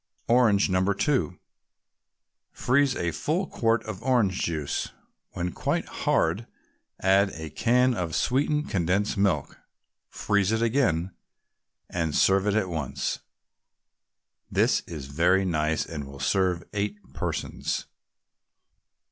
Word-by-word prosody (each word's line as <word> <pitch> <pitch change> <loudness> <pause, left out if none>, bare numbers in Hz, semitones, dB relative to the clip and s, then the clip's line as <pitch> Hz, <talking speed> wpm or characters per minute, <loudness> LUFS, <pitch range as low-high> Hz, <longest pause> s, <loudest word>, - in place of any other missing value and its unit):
ORANGE, 115 -5 +4
No. 95 0 +2
2 110 - 0 1.1
Freeze 135 +1 +2
a 85 -1 -1
full 165 - -1
quart 115 -7 0
of 110 -2 -7
orange 115 -8 +2
juice. 75 -4 -2 0.4
When 90 0 -2
quite - - -1
hard, 90 +9 0 0.5
add 95 +1 +4
a 80 -2 -7
can 125 - +3
of 90 -6 -3
sweetened 150 +4 +1
condensed 95 +3 0
milk, 100 -2 0 0.5
freeze 100 -1 +1
it 110 +1 +1
again, 110 - +1 0.8
and 80 -4 -2
serve 95 +1 +3
at 105 -1 +1
once. 80 -7 -3 1.3
This - - +3
is 75 -5 -6
very 90 +7 +2
nice 80 -3 0
and 75 -3 -6
will 70 0 -11
serve 90 +3 +1
eight 105 0 -2 0.2
persons. - - -3
95 Hz, 115 wpm, -26 LUFS, 85-115 Hz, 1.3 s, ORANGE